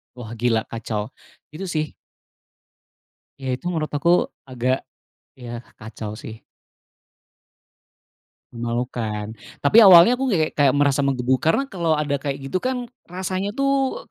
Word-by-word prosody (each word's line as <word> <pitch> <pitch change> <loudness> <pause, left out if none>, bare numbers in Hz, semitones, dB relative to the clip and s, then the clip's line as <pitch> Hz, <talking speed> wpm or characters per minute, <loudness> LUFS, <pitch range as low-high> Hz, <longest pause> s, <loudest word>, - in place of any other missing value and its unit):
Wah, 115 -3 -9
gila, 115 -2 +2
kacau. 110 -2 -4 0.4
Itu 180 +6 -6
sih. 155 -3 -2 1.5
Ya, 135 - -5
itu - - -24
menurut 155 -3 -2
aku 170 +4 +3 0.2
agak, 130 0 -1 0.5
ya, 120 -1 -7 0.2
kacau 110 -1 -7
sih. 110 -1 -10 2.1
Memalukan. 115 -3 -3 0.3
Tapi 210 +11 +7
awalnya 190 +1 +9
aku 265 +1 0
kayak 160 -8 +1
kayak 140 -2 +3
merasa 145 -1 +3
menggebu, 130 -2 +1
karena 165 - +2
kalau 170 -4 +1
ada 145 -2 -1
kayak 140 -1 -3 0.2
gitu 185 - +1
kan 255 +1 -2 0.2
rasanya 185 +2 -3
tuh 275 - 0
140 Hz, 125 wpm, -22 LUFS, 120-180 Hz, 2.1 s, awalnya